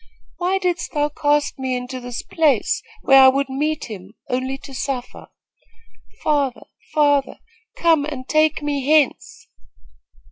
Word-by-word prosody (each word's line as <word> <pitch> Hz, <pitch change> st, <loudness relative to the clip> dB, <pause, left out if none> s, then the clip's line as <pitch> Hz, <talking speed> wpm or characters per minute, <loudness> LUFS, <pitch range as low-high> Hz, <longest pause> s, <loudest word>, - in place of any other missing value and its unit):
Why 365 Hz, +2 st, 0 dB
didst 360 Hz, -2 st, -2 dB
thou 295 Hz, -1 st, +1 dB
cast 290 Hz, -1 st, 0 dB
me 260 Hz, -1 st, -1 dB
into 250 Hz, +1 st, -5 dB
this 245 Hz, -1 st, -6 dB
place, 295 Hz, -9 st, +1 dB, 0.2 s
where 270 Hz, 0 st, +7 dB
I 265 Hz, -, +9 dB
would 275 Hz, +1 st, +2 dB
meet 300 Hz, +3 st, -2 dB
him, 205 Hz, -1 st, -10 dB, 0.2 s
only 260 Hz, +2 st, -2 dB
to 275 Hz, 0 st, -12 dB
suffer? 255 Hz, -2 st, -5 dB, 1.0 s
Father, 285 Hz, -4 st, 0 dB, 0.3 s
father, 290 Hz, -3 st, +2 dB, 0.4 s
come 325 Hz, -4 st, +3 dB
and 270 Hz, -4 st, -6 dB
take 310 Hz, 0 st, +2 dB
me 285 Hz, -2 st, -2 dB
hence!" 300 Hz, 0 st, +1 dB
280 Hz, 135 wpm, -21 LUFS, 260-305 Hz, 1.0 s, I